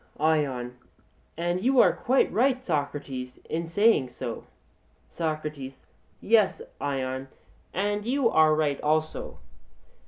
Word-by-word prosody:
ION: 135 -6 0 0.6
And 175 +2 -1
you 260 +3 +3
are - - +6
quite 260 +2 +2
right, 255 +2 +2
Socrates, 140 - -3
in 165 +1 -3
saying 205 - +3
so. 125 - -6 0.6
SOCRATES: 155 -4 -4 0.3
Yes, 215 -3 +3 0.2
Ion, 135 -1 -2 0.4
and 205 +2 -1
you 255 +2 +1
are 155 -6 +4
right 150 -2 0
also. 155 +1 -1
155 Hz, 105 wpm, -27 LUFS, 140-205 Hz, 0.6 s, are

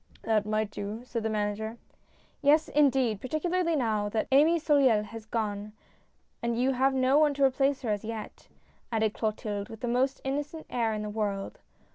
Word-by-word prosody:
" - - -26
That 215 -2 +1
might 215 -1 0
do," 210 +3 -5
said 240 -2 -3
the 220 - -1
manager. 215 +1 -2 0.3
" - - -35 0.3
Yes, 305 +2 +4
indeed, 265 -7 +2
particularly 335 +5 0
now 215 -6 0
that 220 +1 -1
Amy 305 +5 +5
Soleil 275 -9 +3
has 220 0 -10
gone, 210 -2 -3 0.7
and 235 0 -1
you 260 +2 +3
have 265 +1 +2
no 260 +2 +4
one 300 -2 +3
to 280 - +1
replace 270 +1 +1
her 225 - 0
as 205 -1 -2
yet," 220 -1 -7 0.4
added 220 -2 +1
Clotilde, 215 -1 -3
with 225 -1 -10
the 245 - -2
most 260 +3 +1
innocent 290 +4 -3
air 230 -2 +1
in 210 - -3
the 210 - -4
world. 205 -2 -3
230 Hz, 185 wpm, -28 LUFS, 215-275 Hz, 0.7 s, Amy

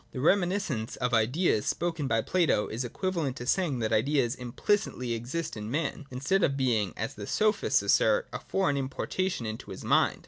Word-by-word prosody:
The 130 - -4
reminiscence 175 - +1
of 125 -1 -2
ideas 115 - +2
spoken 165 -3 -1
of - - -2
by 115 0 +2
Plato 170 - +2
is 115 +4 -4
equiva 185 +9 -3
lent 140 -6 -1
to 120 - -7
saying 155 -1 +1
that 110 - 0
ideas 125 +1 +2
implicitly 125 - -1
exist 135 +8 -4
in 105 0 -6
man, 150 +1 -2
instead 135 +10 0
of 140 -5 +2
being, 115 -7 +1
as 110 - -3
the 100 -1 -8
Sophists 215 0 +2
assert, - - +3
a - - -3
foreign 185 -8 0
importation 135 +3 -2
into 110 0 -6
his - - -8
mind. - - +3
135 Hz, 185 wpm, -29 LUFS, 115-175 Hz, -, assert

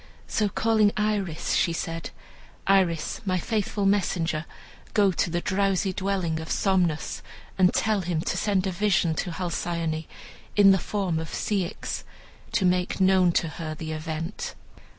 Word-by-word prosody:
So, 210 -2 0
calling 215 0 +3
Iris, 205 -6 0
she 170 - +2
said, 165 0 -4 0.6
"Iris, 185 -5 +2
my 185 -3 0
faithful 205 +1 -1
messenger, 170 -5 +1 0.5
go 200 -3 +5
to 175 - 0
the 175 +1 -1
drowsy 195 0 +1
dwelling 185 -4 -1
of 160 - -7
Somnus, 180 -6 +1 0.3
and 185 -1 +4
tell 215 -2 +1
him 170 -3 -1
to - - -2
send 200 -3 +1
a 190 - 0
vision 175 -3 +2
to 170 - -2
Halcyone 170 -2 -2 0.5
in 200 -1 +7
the 190 - +4
form 185 -4 -1
of 160 - -5
Ceyx, 195 -3 -2 0.5
to 210 -5 +1
make 180 +1 +1
known 190 -2 +5
to 165 - +1
her 155 -1 -5
the 160 +1 -6
event." 160 +4 -4
185 Hz, 150 wpm, -26 LUFS, 165-200 Hz, 0.6 s, in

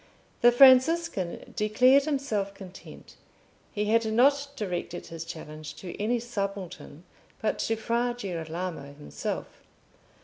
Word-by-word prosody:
The 240 - +7
Franciscan 260 - +4
declared 250 +6 +4
himself 220 -10 -2
content: 190 -2 -12 0.5
he 210 0 -2
had 225 +2 +3
not 280 +5 +3
directed 180 -6 -4
his 165 -1 -7
challenge 155 -1 -8
to 180 -2 -8
any 235 +3 +1
subaltern, 200 -8 -5 0.4
but 220 - -1
to 225 - 0
Fra 235 +2 -1
Girolamo 170 -6 -5
himself. 75 - -5
210 Hz, 110 wpm, -27 LUFS, 175-245 Hz, 0.5 s, The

